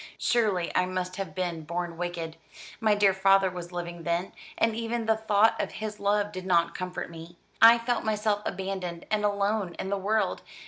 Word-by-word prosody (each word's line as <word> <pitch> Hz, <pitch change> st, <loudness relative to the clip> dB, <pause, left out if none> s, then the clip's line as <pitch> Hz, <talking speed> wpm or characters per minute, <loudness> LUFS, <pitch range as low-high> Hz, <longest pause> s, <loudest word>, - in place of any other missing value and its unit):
"Surely 210 Hz, -8 st, +1 dB
I 180 Hz, -, +3 dB
must 185 Hz, 0 st, -3 dB
have 190 Hz, -6 st, -5 dB
been 175 Hz, -3 st, -2 dB
born 170 Hz, +2 st, -4 dB
wicked. 170 Hz, -2 st, -4 dB, 0.4 s
My 215 Hz, -2 st, +3 dB
dear 200 Hz, -2 st, +4 dB
father 195 Hz, 0 st, +4 dB
was 175 Hz, -1 st, -7 dB
living 175 Hz, -1 st, -5 dB
then; 170 Hz, +2 st, -1 dB, 0.3 s
and 225 Hz, -1 st, +2 dB
even 230 Hz, 0 st, -2 dB
the 220 Hz, 0 st, +3 dB
thought 220 Hz, 0 st, +3 dB
of -, -, -4 dB
his 215 Hz, -1 st, -5 dB
love 205 Hz, 0 st, +1 dB
did 185 Hz, -1 st, -7 dB
not 170 Hz, -2 st, +3 dB
comfort 180 Hz, -2 st, -5 dB
me. 165 Hz, +1 st, -11 dB, 0.2 s
I 230 Hz, +1 st, +9 dB
felt 235 Hz, +1 st, -1 dB
myself 210 Hz, -1 st, 0 dB
abandoned 185 Hz, -3 st, -4 dB
and 215 Hz, -1 st, +1 dB
alone 205 Hz, -2 st, 0 dB
in 190 Hz, -, -4 dB
the 200 Hz, -, 0 dB
world. 215 Hz, +3 st, 0 dB
195 Hz, 185 wpm, -28 LUFS, 175-215 Hz, 0.4 s, I